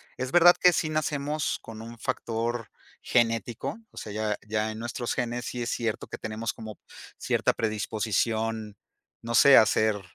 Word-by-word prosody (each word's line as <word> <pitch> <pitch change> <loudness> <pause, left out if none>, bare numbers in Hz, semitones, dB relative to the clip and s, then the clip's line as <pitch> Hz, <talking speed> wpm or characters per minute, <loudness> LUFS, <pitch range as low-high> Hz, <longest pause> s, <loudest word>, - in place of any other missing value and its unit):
Es 130 0 -4
verdad 175 0 +7
que 180 - +6
sí 160 - 0
nacemos 150 -1 -1
con 110 -1 -10
un 115 0 -10
factor 115 0 -3 0.3
genético, 115 - 0
o - - -19
sea, 105 - -6
ya 105 -1 -1
ya 110 0 -1
en 110 - -8
nuestros 120 +1 -3
genes 120 -1 -2
sí 120 +1 -5
es 120 - -2
cierto 115 -4 -2
que - - -7
tenemos 110 +1 -4
como 110 -2 -9 0.4
cierta - - +1
predisposición, 110 0 -1 0.4
no 115 0 -3
sé, 140 -1 +8
a - - +8
ser, 110 -1 +1
115 Hz, 165 wpm, -27 LUFS, 110-120 Hz, 0.4 s, sé